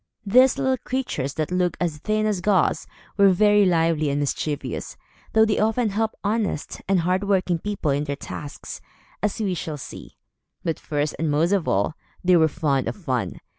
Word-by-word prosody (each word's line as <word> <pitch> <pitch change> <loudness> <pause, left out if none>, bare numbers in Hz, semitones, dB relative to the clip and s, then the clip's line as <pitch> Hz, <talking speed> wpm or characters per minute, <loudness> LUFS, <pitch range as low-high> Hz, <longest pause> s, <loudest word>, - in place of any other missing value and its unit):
These 255 +6 +5
little 260 -1 +1
creatures, 245 - -3
that 155 +1 -2
looked 180 -1 0
as 165 -4 -2
thin 215 +6 0
as 210 -4 0
gauze, 195 -1 +2 0.3
were 200 -1 +6
very 205 +2 +4
lively 165 -3 +2
and 140 +1 0
mischievous, 145 +1 -3 0.4
though 220 0 +6
they 215 - 0
often 220 +2 +1
helped 220 +2 -1
honest 210 -6 -2
and 190 -2 +3
hard 185 +3 0
working 185 -4 +1
people 200 -6 -2
in 145 +2 0
their 140 -1 -3
tasks, 145 +1 -8 0.4
as 210 +2 -1
we 200 -4 0
shall 160 -3 -4
see. - - -10 0.5
But 165 -3 -2
first 145 0 -2
and 160 -1 0
most 155 +5 +2
of 195 -5 +1
all, 100 +9 +1 0.3
they 180 0 +5
were 160 -2 +5
fond 140 -3 0
of - - -2
fun. 130 - -3
180 Hz, 180 wpm, -23 LUFS, 150-210 Hz, 0.5 s, were